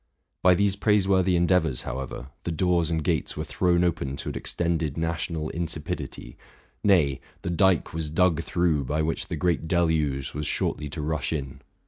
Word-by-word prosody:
By 90 0 +6
these 100 +1 +2
praiseworthy 95 -3 +3
endeavors, 85 -6 +2
however, 65 0 -5
the 85 - -2
doors 85 0 +1
and 80 -2 -1
gates - - -1
were - - -2
thrown 90 -1 +2
open 70 -6 -1
to - - -4
an - - -6
extended 85 -4 0
national 80 -1 -2
insipidity, 80 -2 -4 0.5
nay, 75 -10 +3 0.2
—the 85 - -2
dike 90 0 +2
was 80 -1 -3
dug 85 0 +2
through 80 -5 +1
by 75 +4 0
which 80 +1 -2
the 85 - -3
great 80 +1 0
deluge 80 -6 +1
was 75 0 -3
shortly 75 -1 -1
to 75 +1 -4
rush 80 0 -1
in. 70 -3 -4
80 Hz, 165 wpm, -26 LUFS, 75-90 Hz, 0.5 s, By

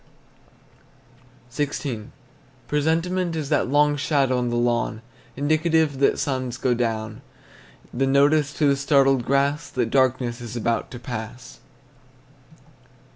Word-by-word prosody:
XVI. 130 -4 -3 0.6
Presentiment 165 +5 0
is 150 -3 -3
that - - +1
long 145 +2 +3
shadow 140 -3 +1
on 125 -1 -1
the 120 - -2
lawn 120 -2 0 0.3
Indicative 155 0 +1
that 140 - +3
suns 130 -3 -2
go 130 -2 +1
down; 110 -2 -3 0.7
The 135 +2 0
notice 145 +2 +3
to 155 - 0
the 140 - +4
startled 135 -2 +3
grass 140 +3 0
That 120 -3 -2
darkness 130 -2 +1
is 120 -1 -7
about 115 0 -1
to 120 - -9
pass. 120 0 -8
135 Hz, 120 wpm, -23 LUFS, 120-145 Hz, 0.7 s, the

